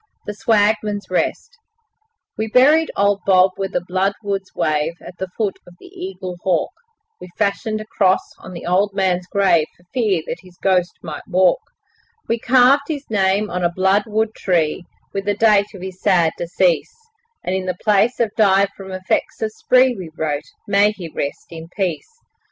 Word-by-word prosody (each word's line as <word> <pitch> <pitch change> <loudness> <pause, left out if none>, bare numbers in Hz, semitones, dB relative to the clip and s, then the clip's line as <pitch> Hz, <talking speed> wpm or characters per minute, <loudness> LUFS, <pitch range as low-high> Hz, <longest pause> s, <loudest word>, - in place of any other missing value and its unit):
The 210 - -4
Swagman's 210 -1 +1
Rest 480 0 -2 0.8
We 220 - -2
buried 290 +8 +4
old 200 0 +2
Bob 185 -1 +5
where 195 0 -2
the 180 -2 -3
bloodwoods 195 +1 -2
wave 155 +2 0
At 180 - -12
the 190 - -3
foot 210 -4 -1
of 175 - -15
the - - -15
Eaglehawk; 185 - -3 0.5
We 180 - -10
fashioned 215 +1 -1
a 215 - -7
cross 195 -4 +1
on 185 - -10
the 170 - -8
old 195 +3 +1
man's 180 -2 0
grave, 180 -6 +2
For 175 - -25
fear 210 -10 +1
that - - -5
his 180 -2 -18
ghost 180 -2 +2
might 155 -3 -7
walk; 180 -1 +3 0.7
We 230 - 0
carved 260 +4 +4
his 290 -3 -4
name 200 0 +1
on 180 0 -2
a 175 - +3
bloodwood 210 +4 +1
tree, 175 -3 0 0.3
With 195 0 -3
the 205 -1 0
date 210 -2 +4
of 185 - -9
his 190 -1 -8
sad 170 -3 +3
decease, 175 - 0 0.5
And 180 - -2
in 185 -1 -1
place 215 +3 +2
of 230 -3 +1
'Died 200 -2 +4
from 190 -1 -10
effects 185 0 -2
of 215 - -1
spree', 255 +3 +3
We 185 -5 -7
wrote 150 -2 -2 0.2
'May 205 +1 +3
he 180 -5 -8
rest 140 -2 -4
in 165 -1 -8
peace'. 180 -6 -2
195 Hz, 170 wpm, -20 LUFS, 180-215 Hz, 0.8 s, Bob